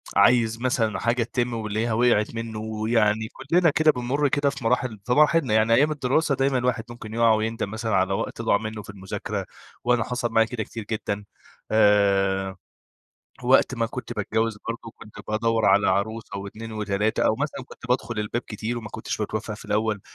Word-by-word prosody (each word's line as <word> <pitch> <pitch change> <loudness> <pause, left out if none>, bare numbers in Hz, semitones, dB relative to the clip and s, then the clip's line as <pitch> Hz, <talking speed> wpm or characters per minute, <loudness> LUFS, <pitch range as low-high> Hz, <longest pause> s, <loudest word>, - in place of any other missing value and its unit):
عايز 115 +2 +4
مثلًا 120 -4 0
حاجة 120 0 +1
تتم 120 0 -2
ويلاقيها 110 +1 -1
وقعِت 115 -1 +2
منّه، 115 -1 -4
ويعني 110 0 +1
كُلّنا 165 +5 +2
كده 155 +1 +4
بنمُر 130 +4 0
كده 145 0 +2
في 135 -3 -7
مراحل 120 -2 0
في - - -3
مراحلنا. 150 -4 +4
يعني 110 +1 +4
أيام 145 +6 +4
الدراسة 145 +1 +1
دايمًا 135 0 +1
الواحد 125 -2 0
ممكن 115 -2 -9
يُقع 115 -1 +4
ويندم 110 -1 -1
مثلًا 110 -2 -1
على 95 +1 +2
وقت 115 - -3
ضاع 110 -3 +3
منه 110 0 -5
في - - -15
المذاكرة، 95 -2 -5 0.4
وأنا 125 -1 +2
حصل 125 -2 -2
معايا 115 0 +4
كده 110 -2 -3
كتير 115 +1 -7
جدًا، 105 -1 -3 0.5
آآ. 100 -3 +3 0.9
وقت 130 +1 +4
ما 115 -1 0
كنت 120 +1 -6
باتجوّز 110 +1 -1
برضه 115 -1 -5
كنت 105 -1 -14
بادَوّر 110 +1 +1
على 100 +2 +4
عروسة 100 +2 -2
و2 110 +3 -7
و3 105 0 0
أو 110 - +3
مثلًا 140 -1 -3
كنت 115 - -12
بادخل 115 -3 0
الباب 110 +3 -2
كتير 115 +2 -4
وما 110 -2 -7
كُنتش - - -4
باتوفّق - - -3
في - - -11
الأول، 105 -1 0
115 Hz, 180 wpm, -24 LUFS, 105-125 Hz, 0.9 s, عايز